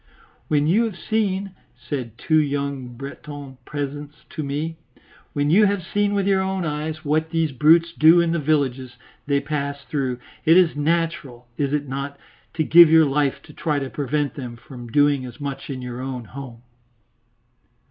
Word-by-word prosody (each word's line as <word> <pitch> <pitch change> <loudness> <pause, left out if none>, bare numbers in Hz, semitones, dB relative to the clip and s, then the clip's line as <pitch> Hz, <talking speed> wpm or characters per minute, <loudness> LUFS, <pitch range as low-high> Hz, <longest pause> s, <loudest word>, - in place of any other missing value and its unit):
"When 150 -1 +2
you 205 +9 +3
have 210 -5 -5
seen," 200 -3 -1 0.3
said 120 -6 -5
two 155 +4 +2
young 140 -3 -2
Breton 140 0 -9
peasants 145 0 -6
to 155 - -4
me, 150 +3 -3 0.6
"when 145 0 +1
you 210 +4 +6
have 200 -2 -1
seen 205 +4 0
with 200 -1 +1
your 195 -1 +3
own 190 -1 -2
eyes 155 +1 -4
what 155 +2 +1
these 165 -2 0
brutes 165 +5 +4
do 165 +2 +6
in 170 -1 +2
the 170 - 0
villages 135 -4 -1 0.3
they 140 -1 +2
pass 140 -1 -3
through, 130 -1 -2 0.3
it 165 +2 +6
is 180 -4 +4
natural, 150 -5 -1
is 140 0 -1
it 145 -1 -1
not, 140 +1 -5 0.4
to 160 - +1
give 170 +2 +8
your 160 0 +6
life 140 -1 0
to 150 - -14
try 150 -1 -1
to 135 -2 -3
prevent 145 0 -1
them 125 -4 -7
from 120 0 -11
doing 145 0 +3
as 125 -1 -9
much 140 -1 -5
in 130 -2 -5
your 125 0 -6
own 130 -2 -5
home?" 120 0 -10
145 Hz, 175 wpm, -22 LUFS, 135-165 Hz, 0.6 s, give